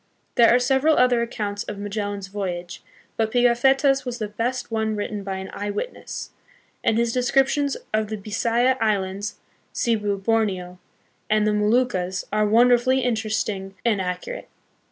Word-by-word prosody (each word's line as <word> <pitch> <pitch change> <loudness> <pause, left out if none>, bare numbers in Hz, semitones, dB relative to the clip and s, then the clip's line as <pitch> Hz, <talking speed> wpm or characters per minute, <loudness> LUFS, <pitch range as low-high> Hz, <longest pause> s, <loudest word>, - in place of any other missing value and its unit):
1 - - -44
There 235 -1 +6
are 240 - +6
several 265 +5 +3
other 250 -1 +4
accounts 210 -3 -3
of 205 - -6
Magellan's 205 -1 -4
voyage; 180 -3 -5 0.4
but 220 -1 +1
Pigafetta's 265 +3 +3
was 245 -2 -4
the 215 - -3
best 240 +4 -3
one 220 -1 0
written 205 0 -3
by 195 -1 -4
an 190 0 -6
eye 205 0 -4
witness, - - -5 0.5
and 225 - +2
his 235 0 +1
descriptions 270 +3 +2 0.2
of 215 0 +1
the 215 +1 -4
Bisaya 230 +5 +1
Islands, 200 -1 -1 0.4
Cebu, 210 -4 0
Borneo, 195 -4 -1 0.5
and 215 0 +3
the 215 - +2
Moluccas 210 -4 +1
are 215 0 +2
won 235 +4 +5
derfully 255 +2 +3
interesting 215 -4 -2
and 215 -5 +2
accurate. 185 - -5
220 Hz, 155 wpm, -23 LUFS, 205-245 Hz, 0.5 s, There